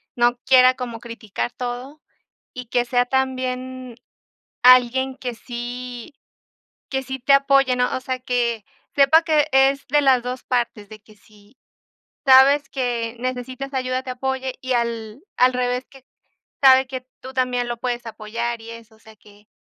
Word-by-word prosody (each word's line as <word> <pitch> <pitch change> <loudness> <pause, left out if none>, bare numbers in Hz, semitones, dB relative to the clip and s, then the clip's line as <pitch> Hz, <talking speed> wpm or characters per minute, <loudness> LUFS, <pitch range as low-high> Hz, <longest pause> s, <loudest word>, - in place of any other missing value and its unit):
no 240 0 +2
quiera 255 -1 +6
como 240 -3 -6
criticar 230 -1 -5
todo 250 +5 -6 0.5
y 250 -2 -8
que 245 +1 0
sea 245 0 +1
también 255 -1 -3 0.7
alguien 255 +1 +5
que 245 -2 -5
sí 245 +2 -7 0.8
que 265 -1 -2
sí 265 0 -6
te 275 +2 +4
apoye, 275 -2 +3
¿no? 250 0 0
O - - -4
sea, 255 0 -4
que 235 -3 -1 0.3
sepa 285 +4 +6
que 310 -2 +2
es 270 +1 +3
de 295 +2 +3
las 260 -3 +4
2 250 +1 -6
partes, 235 -4 -2
de 215 -1 -11
que 215 +1 -20
si 210 +2 -23 0.7
sabes 270 +2 +6
que 240 -3 -3
necesitas 255 +2 -5
ayuda, 255 0 -1
te 255 - -6
apoye 265 0 -3
y 260 0 -3
al 230 0 -3 0.3
revés, 250 +1 -2
que 270 -2 -17 0.6
sabe 265 0 +7
que 255 -1 -7
tú 260 +1 -9
también 250 -1 -1
lo 240 - -3
puedes 240 0 -4
apoyar 230 +2 -4
y 230 - -10
eso, 230 -1 -13
o - - -26
sea, 220 0 -17
que 205 0 -21
250 Hz, 160 wpm, -21 LUFS, 235-265 Hz, 0.8 s, sabe